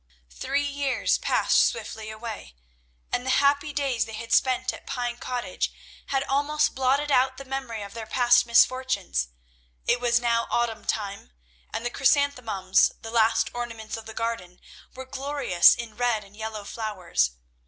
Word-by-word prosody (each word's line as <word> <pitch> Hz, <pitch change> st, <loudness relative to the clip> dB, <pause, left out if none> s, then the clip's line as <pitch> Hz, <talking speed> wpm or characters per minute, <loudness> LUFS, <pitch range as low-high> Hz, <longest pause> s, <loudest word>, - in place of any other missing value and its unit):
Three 280 Hz, -, -1 dB
years 280 Hz, -2 st, 0 dB
passed -, -, +3 dB
swiftly 215 Hz, -1 st, -3 dB
away, 220 Hz, -, -7 dB, 0.6 s
and 245 Hz, -, 0 dB
the 260 Hz, -, -3 dB
happy 285 Hz, +1 st, +2 dB
days 275 Hz, -5 st, 0 dB
they 220 Hz, -, -10 dB
had 230 Hz, +1 st, -4 dB
spent 255 Hz, -1 st, +2 dB
at -, -, -12 dB
Pine 245 Hz, -1 st, -3 dB
Cottage 245 Hz, 0 st, -3 dB, 0.4 s
had 270 Hz, -1 st, 0 dB
almost 290 Hz, +2 st, +1 dB
blotted 270 Hz, +3 st, +1 dB
out 260 Hz, 0 st, +3 dB
the 275 Hz, -, -8 dB
memory 260 Hz, -5 st, -4 dB
of 200 Hz, -, -9 dB
their 225 Hz, -1 st, -7 dB
past 245 Hz, +1 st, +4 dB
misfortunes. 235 Hz, -, +2 dB, 0.6 s
It -, -, +2 dB
was 240 Hz, -1 st, +3 dB
now 235 Hz, -1 st, +1 dB
autumn 230 Hz, -2 st, -1 dB
time, 200 Hz, -, -3 dB, 0.4 s
and 230 Hz, -, -4 dB
the 240 Hz, -, -1 dB
chrysanthemums, 250 Hz, -10 st, +2 dB
the 225 Hz, -, -6 dB
last 225 Hz, -1 st, +3 dB
ornaments 230 Hz, -2 st, -5 dB
of 225 Hz, -1 st, -9 dB
the 220 Hz, -, -9 dB
garden, 230 Hz, -6 st, -4 dB, 0.4 s
were 260 Hz, 0 st, -7 dB
glorious 265 Hz, -9 st, +3 dB
in 230 Hz, -2 st, -7 dB
red 240 Hz, -3 st, 0 dB
and 200 Hz, +1 st, -18 dB
yellow 220 Hz, -1 st, -5 dB
flowers. 190 Hz, -, -1 dB
240 Hz, 155 wpm, -26 LUFS, 220-265 Hz, 0.6 s, past